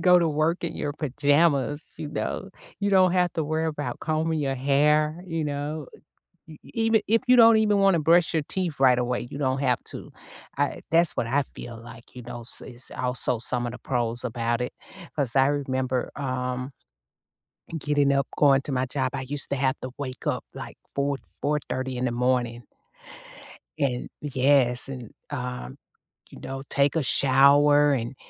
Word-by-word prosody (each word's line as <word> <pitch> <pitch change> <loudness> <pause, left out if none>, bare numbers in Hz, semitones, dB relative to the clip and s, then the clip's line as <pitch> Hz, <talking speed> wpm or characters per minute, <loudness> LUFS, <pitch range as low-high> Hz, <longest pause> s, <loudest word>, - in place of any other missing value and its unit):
go 180 -1 +6
to 170 -2 +2
work 155 +4 0
in - - -3
your 145 - -3
pajamas, 145 0 +1 0.2
you 150 - -5
know, 190 +5 -4 0.3
you 200 0 0
don't 185 -2 +5
have 180 -1 +2
to 160 - 0
worry 155 +2 -1
about 150 -2 -4
combing 160 0 -1
your 135 -1 -1
hair, 150 +4 +2
you 165 -2 -2
know? 145 +1 -4 0.6
E 155 - -11 0.2
even 225 -1 +3
if 225 +2 +2
you 255 - +7
don't 230 -2 +8
even 210 -2 +3
wanna 195 -4 +4
brush 165 +2 +3
your 155 - +2
teeth 175 -7 -3
right 125 -2 +5
away, 125 0 -2
you 140 - -7
don't 130 -2 0
have 125 -3 +2
to, - - -8 0.5
I - - 0
that's 165 0 +4
what 115 - -2
I 140 +4 +1
feel 120 -1 -8
like, 115 0 -13
you 125 - -7
know, 120 0 -8 0.2
is 120 +1 -10
also 125 -1 +1
some 120 +1 0
of 120 - -4
the 125 - -8
pros 120 -2 -2
about 120 0 -1
it. 125 - -4 0.4
'Cause 140 -4 -2
I 135 0 +5
remember, 130 -3 -1
um, 130 -1 -3 1.1
getting 145 -1 +1
up, 140 0 +1
going 135 -2 +4
to 140 - -5
my 130 0 0
job, 130 0 -2
I 135 - -3
used 145 0 +2
to 140 - 0
have 130 0 +1
to 130 - -5
wake 130 -2 -6
up, - - -1
like, - - -8 0.2
4:00, 140 0 0 0.2
4:30 130 -3 -2
in 125 - -2
the 120 - -1
morning. 120 -1 0 1.2
And 125 -3 -1
yes, 135 -3 +2
and, 125 -5 -8 0.2
um, 125 - -5 0.5
you - - -13
know, 135 0 -6
take 140 +2 +2
a 160 - +1
shower 145 +2 +5
and, 120 +1 -3
140 Hz, 180 wpm, -25 LUFS, 125-155 Hz, 1.2 s, don't